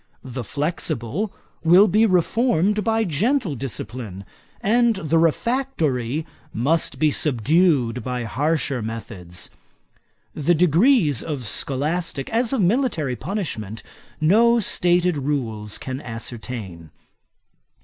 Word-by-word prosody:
The 130 Hz, -1 st, -6 dB
flexible 150 Hz, -, -2 dB, 0.3 s
will 180 Hz, +5 st, +7 dB
be 215 Hz, +4 st, +4 dB
reformed 210 Hz, +1 st, +2 dB
by 225 Hz, +1 st, +1 dB
gentle 205 Hz, -, 0 dB
discipline, 115 Hz, -6 st, -6 dB, 0.3 s
and 235 Hz, +2 st, +3 dB
the 165 Hz, -3 st, +1 dB
refractory 160 Hz, -, 0 dB, 0.3 s
must 150 Hz, +8 st, 0 dB
be 155 Hz, -1 st, +3 dB
subdued 140 Hz, -, +2 dB
by 125 Hz, 0 st, -3 dB
harsher 140 Hz, +2 st, -1 dB
methods. 100 Hz, -6 st, -7 dB, 0.8 s
The 160 Hz, +3 st, +2 dB
degrees 175 Hz, -, +4 dB
of 145 Hz, -5 st, -4 dB
scholastick, 140 Hz, +7 st, -2 dB
as 230 Hz, +1 st, +1 dB
of 265 Hz, -5 st, +1 dB
military 180 Hz, -, +1 dB
punishment, 115 Hz, -, -4 dB, 0.4 s
no 230 Hz, +9 st, +4 dB
stated 180 Hz, -4 st, +2 dB
rules 115 Hz, -7 st, -2 dB
can 130 Hz, +1 st, -6 dB
ascertain. 115 Hz, -, -7 dB
155 Hz, 100 wpm, -22 LUFS, 125-190 Hz, 0.8 s, will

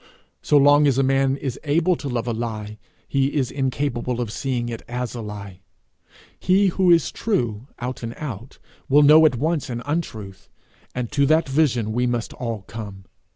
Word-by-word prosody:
So 150 Hz, -, +3 dB
long 145 Hz, +1 st, +6 dB
as 135 Hz, -2 st, +2 dB
a 135 Hz, -, +3 dB
man 135 Hz, 0 st, +2 dB
is 135 Hz, -2 st, -5 dB
able 165 Hz, +4 st, +2 dB
to 140 Hz, -, -5 dB
love 120 Hz, -2 st, -2 dB
a 120 Hz, -, -1 dB
lie, 110 Hz, -2 st, -5 dB, 0.3 s
he 135 Hz, +1 st, 0 dB
is 135 Hz, -4 st, 0 dB
incapable 130 Hz, -2 st, -2 dB
of 120 Hz, -4 st, -3 dB
seeing 125 Hz, -1 st, -2 dB
it 115 Hz, -1 st, -5 dB
is 125 Hz, -1 st, -3 dB
a 120 Hz, -, -5 dB
lie. 100 Hz, -3 st, -8 dB, 0.8 s
He 190 Hz, +2 st, +3 dB
who 185 Hz, 0 st, +1 dB
is 170 Hz, -3 st, +4 dB
true, 120 Hz, -, -2 dB
out 125 Hz, +1 st, -5 dB
and 115 Hz, 0 st, -5 dB
out, 125 Hz, -4 st, -7 dB, 0.3 s
will 145 Hz, +2 st, +6 dB
know 155 Hz, +2 st, +8 dB
at 145 Hz, -, -1 dB
once 155 Hz, +3 st, -1 dB
an 120 Hz, -1 st, -4 dB
untruth; 110 Hz, -, -5 dB, 0.5 s
and 125 Hz, -2 st, -3 dB
to 140 Hz, -1 st, +2 dB
that 155 Hz, +1 st, +3 dB
vision 130 Hz, -6 st, +1 dB
we 125 Hz, +2 st, +1 dB
must 120 Hz, -2 st, -2 dB
all 115 Hz, -5 st, -5 dB
come. 100 Hz, -2 st, -9 dB
125 Hz, 185 wpm, -22 LUFS, 115-145 Hz, 0.8 s, know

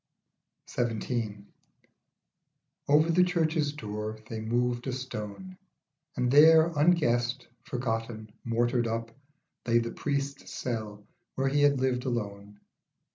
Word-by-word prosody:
XVII. 115 Hz, -3 st, -2 dB, 1.4 s
OVER 155 Hz, +3 st, +4 dB
the 180 Hz, +2 st, +5 dB
church's 160 Hz, -4 st, +1 dB
door 105 Hz, -4 st, -5 dB
they 110 Hz, -1 st, -5 dB
moved 120 Hz, +2 st, -1 dB
a -, -, 0 dB
stone, 130 Hz, -, -6 dB, 0.6 s
And 125 Hz, -1 st, +1 dB
there, 160 Hz, +3 st, +7 dB
unguessed, 135 Hz, -6 st, +2 dB, 0.2 s
forgotten, 115 Hz, -3 st, -3 dB
mortared 120 Hz, +1 st, +1 dB
up, 115 Hz, 0 st, -3 dB, 0.6 s
Lay 115 Hz, 0 st, +4 dB
the 115 Hz, 0 st, 0 dB
priest's 140 Hz, -1 st, -3 dB
cell 110 Hz, -4 st, -5 dB, 0.3 s
where 135 Hz, 0 st, +1 dB
he 145 Hz, +1 st, +1 dB
had 145 Hz, -2 st, +4 dB
lived 130 Hz, -1 st, 0 dB
alone. 105 Hz, -4 st, -4 dB
120 Hz, 110 wpm, -29 LUFS, 115-145 Hz, 1.4 s, there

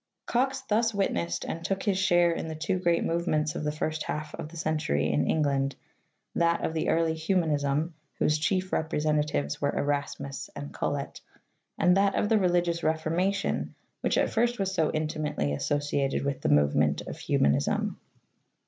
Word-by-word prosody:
Cox 265 Hz, +2 st, 0 dB
thus 225 Hz, -3 st, +1 dB
witnessed 85 Hz, -, -1 dB
and 165 Hz, -, -4 dB
took 195 Hz, +1 st, -1 dB
his 195 Hz, -3 st, +1 dB
share 175 Hz, -2 st, +4 dB
in 165 Hz, -, -3 dB
the 160 Hz, -, -5 dB
two 165 Hz, +4 st, -1 dB
great 170 Hz, -2 st, +2 dB
movements 155 Hz, -3 st, 0 dB
of -, -, -4 dB
the 150 Hz, -, 0 dB
first 155 Hz, +1 st, -2 dB
half 150 Hz, 0 st, -4 dB
of 150 Hz, -, -6 dB
the 170 Hz, -, -11 dB
century 155 Hz, -, 0 dB
in 75 Hz, +2 st, +1 dB
Eng 155 Hz, -, +2 dB
land, 140 Hz, -1 st, 0 dB, 0.6 s
that 170 Hz, 0 st, +2 dB
of -, -, -2 dB
the 160 Hz, -, 0 dB
early 165 Hz, 0 st, +2 dB
Humanism, 160 Hz, -2 st, 0 dB, 0.2 s
whose 150 Hz, 0 st, +2 dB
chief 185 Hz, +3 st, 0 dB
representatives 150 Hz, -, 0 dB
were 140 Hz, 0 st, 0 dB
Erasmus 140 Hz, -1 st, -2 dB
and 145 Hz, 0 st, -7 dB
Colet, 140 Hz, -1 st, -3 dB, 0.6 s
and 180 Hz, +1 st, +4 dB
that 200 Hz, 0 st, +3 dB
of 210 Hz, -, +1 dB
the 220 Hz, -, +4 dB
religious 175 Hz, -2 st, +1 dB
Reformation 165 Hz, +5 st, 0 dB, 0.2 s
which -, -, 0 dB
at -, -, +2 dB
first 240 Hz, +2 st, +1 dB
was 195 Hz, -1 st, -1 dB
so 160 Hz, -5 st, +1 dB
intimately 155 Hz, -, -1 dB
associated 140 Hz, -, 0 dB
with 140 Hz, -1 st, -2 dB
the -, -, 0 dB
movement 75 Hz, +1 st, +3 dB
of -, -, -8 dB
Humanism. 70 Hz, +1 st, +1 dB
155 Hz, 165 wpm, -28 LUFS, 145-180 Hz, 0.6 s, share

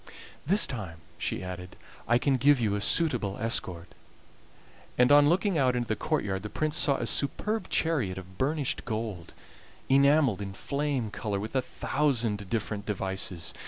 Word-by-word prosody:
"This 200 Hz, +5 st, +6 dB
time," 100 Hz, -10 st, -6 dB, 0.2 s
she -, -, -2 dB
added, 90 Hz, 0 st, -7 dB, 0.3 s
"I 120 Hz, -, +4 dB
can 135 Hz, +1 st, +1 dB
give 140 Hz, +2 st, +4 dB
you 110 Hz, -4 st, 0 dB
a 105 Hz, -, -1 dB
suitable 115 Hz, -8 st, +2 dB
escort"; 90 Hz, -6 st, -2 dB, 1.1 s
and 125 Hz, +2 st, +4 dB
on 145 Hz, 0 st, +7 dB
looking 180 Hz, 0 st, +1 dB
out 130 Hz, -2 st, +2 dB
into 120 Hz, -1 st, -2 dB
the 110 Hz, -, 0 dB
courtyard 105 Hz, -12 st, -2 dB
the 105 Hz, -, -6 dB
Prince 155 Hz, +8 st, -2 dB
saw 145 Hz, -3 st, +3 dB
a -, -, -3 dB
superb 210 Hz, -, -1 dB
chariot 130 Hz, -, +1 dB
of 95 Hz, 0 st, -11 dB
burnished 145 Hz, 0 st, 0 dB
gold, 110 Hz, -7 st, -5 dB, 0.5 s
enameled 140 Hz, -5 st, +4 dB
in 100 Hz, -1 st, -5 dB
flame 140 Hz, -2 st, -2 dB
color 105 Hz, -2 st, -3 dB
with 110 Hz, +5 st, -6 dB
a 130 Hz, -, +3 dB
thousand 115 Hz, -9 st, -1 dB
different 105 Hz, -2 st, -3 dB
devices. 95 Hz, -4 st, -2 dB
115 Hz, 160 wpm, -28 LUFS, 100-145 Hz, 1.1 s, on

